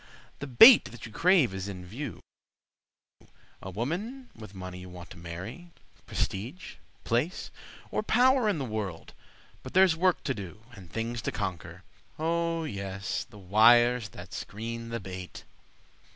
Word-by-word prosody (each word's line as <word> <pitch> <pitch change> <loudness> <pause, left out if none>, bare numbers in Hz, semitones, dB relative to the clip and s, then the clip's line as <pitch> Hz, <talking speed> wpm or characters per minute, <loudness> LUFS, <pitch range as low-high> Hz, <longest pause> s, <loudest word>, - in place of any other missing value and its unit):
the 140 - -5
bait 225 - +9
that 120 -3 -9
you 115 - -9
crave 170 - +4
is 95 +1 -4
in 90 -2 -7
view: 110 - -6 1.4
A 95 - -7
woman 185 - -4
with 110 -3 -11
money 90 -1 -7
you 90 0 -10
want 90 -1 -11
to 90 - -10
marry, 95 - -8 0.4
Prestige, 120 - -4 0.3
place, 125 +10 -1 0.4
or - - 0
power 245 +1 +4
in 200 - 0
the 140 - -3
world. 105 -7 -5 0.5
But - - -10
there's 185 -3 +6
work 180 +2 +2
to 135 - 0
do 100 0 -9
and 95 -7 -13
things 115 +1 -3
to - - -2
conquer— 95 -5 -5 0.3
Oh, 165 +1 0
yes! 100 -6 -4
the 110 - -14
wires 115 +4 +5
that 90 0 -11
screen 115 +2 -6
the 115 0 -3
bait. 95 -2 -8
115 Hz, 150 wpm, -29 LUFS, -, 1.4 s, bait